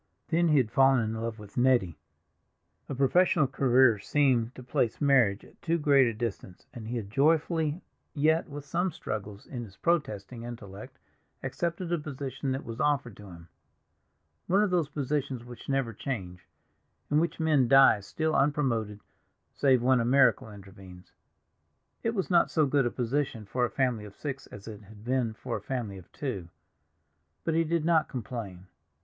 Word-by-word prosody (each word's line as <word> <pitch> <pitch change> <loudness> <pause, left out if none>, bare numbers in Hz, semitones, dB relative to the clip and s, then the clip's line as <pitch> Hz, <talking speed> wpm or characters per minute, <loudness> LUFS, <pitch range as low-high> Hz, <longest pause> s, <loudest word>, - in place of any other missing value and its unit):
Then 170 +1 +2
he 150 -2 +4
had 120 -5 +2
fallen 135 +1 +5
in 110 -1 -1
love 115 0 -4
with 105 -2 -13
Nettie; 120 -10 +2 0.9
a 140 - -3
professional 150 +4 +3
career 130 -4 +3
seemed 125 -1 +1
to 130 - -10
place 120 -2 -1
marriage 125 -9 +3
at - - -21
too 170 0 0
great 140 -4 +4
a 115 - -1
distance, 105 -5 -5
and 110 -2 -8
he 120 +2 -3
had 100 -3 -6
joyfully, 160 - +1 0.3
yet 160 +3 +2
with 145 0 -8
some 175 +5 -1
struggles 105 -7 -6
in 125 -3 -6
his 100 -3 -13
protesting 120 - -1
intellect, 105 -4 -9 0.5
accepted 170 0 -3
a 170 - +1
position 140 -2 -4
that 135 +1 -3
was 115 +1 -7
offered 140 -7 0
to 105 - -12
him—one 90 - -6
of 205 - 0
those 170 -5 +1
positions 140 -4 -2
which 120 +2 -11
never 135 -4 0
change, 95 - -6 0.6
in 150 - +4
which 170 +1 -1
men 150 -6 +3
die 135 -4 +7
still 155 +10 -2
unpromoted, 130 -8 0 0.5
save 130 -3 +3
when 130 0 +4
a - - +1
miracle 130 -2 +3
intervenes. 95 -2 -13 0.9
It 230 0 -1
was 190 -2 -2
not 170 -1 +4
so 155 -2 +2
good 140 -2 +2
a - - 0
position 125 -2 -2
for 125 +4 0
a - - -3
family 125 -5 -1
of 100 - -12
six 140 -2 -6
as 105 0 -12
it 105 -2 -8
had 105 +1 -15
been 125 -3 0
for 120 +1 -4
a - - -9
family 115 -7 -4
of 90 - -17
two, 100 - -5 0.9
but 165 - 0
he 165 +1 +3
did 165 0 -1
not 165 -2 +3
complain. 110 -7 -6
130 Hz, 170 wpm, -28 LUFS, 110-145 Hz, 0.9 s, die